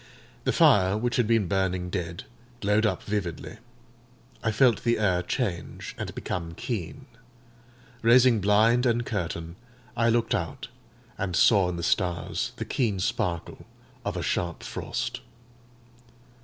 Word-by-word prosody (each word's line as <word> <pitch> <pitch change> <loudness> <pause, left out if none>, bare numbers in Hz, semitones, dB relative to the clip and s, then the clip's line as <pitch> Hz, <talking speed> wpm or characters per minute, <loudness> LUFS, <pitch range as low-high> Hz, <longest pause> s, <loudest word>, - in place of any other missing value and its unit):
The - - +3
fire, 95 0 +4
which 120 +2 -1
had 120 -4 +2
been 115 -4 +2
burning 95 -1 -1
dead, 85 -2 -4 0.4
glowed 105 +1 +2
up 95 -4 -2
vividly. 100 0 -4 0.8
I 115 - 0
felt 120 0 +3
the 120 0 +2
air 95 -4 +2
change, 90 -1 -3
and - - -6
become 85 -2 -4
keen. 115 - -5 1.0
Raising 120 -1 +5
blind 110 +5 +4
and 120 0 +1
curtain, 85 -3 -4 0.4
I 115 0 +2
looked 115 0 +1
out, - - -3 0.5
and 95 -3 -2
saw 95 -3 +5
in 90 - -3
the 85 - -4
stars 90 0 0
the - - -5
keen 110 -7 0
sparkle 85 -2 -2 0.4
of - - -3
a - - -2
sharp 85 -2 -2
frost. - - -4
100 Hz, 135 wpm, -27 LUFS, 90-115 Hz, 1.0 s, Raising